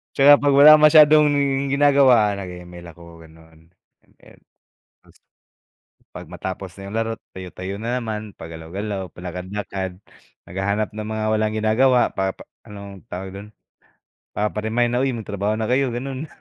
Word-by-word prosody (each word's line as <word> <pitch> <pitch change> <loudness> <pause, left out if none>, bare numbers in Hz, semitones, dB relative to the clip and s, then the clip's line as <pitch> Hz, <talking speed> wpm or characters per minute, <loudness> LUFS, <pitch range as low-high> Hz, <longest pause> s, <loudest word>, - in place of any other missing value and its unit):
'Tsaka 145 +1 +7
pag 145 - +3
wala 145 +2 +8
masyadong 150 0 +6 0.5
ginagawa 135 -7 +4
nag 95 -2 -7
e-ML 90 0 -11
ako, 85 -1 -15
ganon 80 +1 -20 0.3
ML, - - -22 1.7
'pag 90 - -10
matapos 90 +1 -7
na 100 0 -10
yung 110 - -5
laro 115 0 -2 0.2
tayo-tayo 95 +1 -8
na 120 +3 -2
naman 110 -2 -6
pagalaw-galaw, 95 +5 -6
palakad-lakad 95 +1 -6 0.5
naghahanap 100 +3 -2
ng 105 0 -7
mga 110 0 -3
walang 110 0 0
ginagawa 115 +4 +3
para 95 0 -2
pa - - -13 0.2
anong 100 0 -11
tawag 95 0 -7
dun, 100 +2 -10 0.8
papa-remind 110 +3 -1
na, 125 - +1
uy 135 - 0
magtrabaho 105 -2 -3
na 110 - -2
kayo, 130 0 +1
gano'n. 135 +4 -5
105 Hz, 135 wpm, -21 LUFS, 95-120 Hz, 1.7 s, wala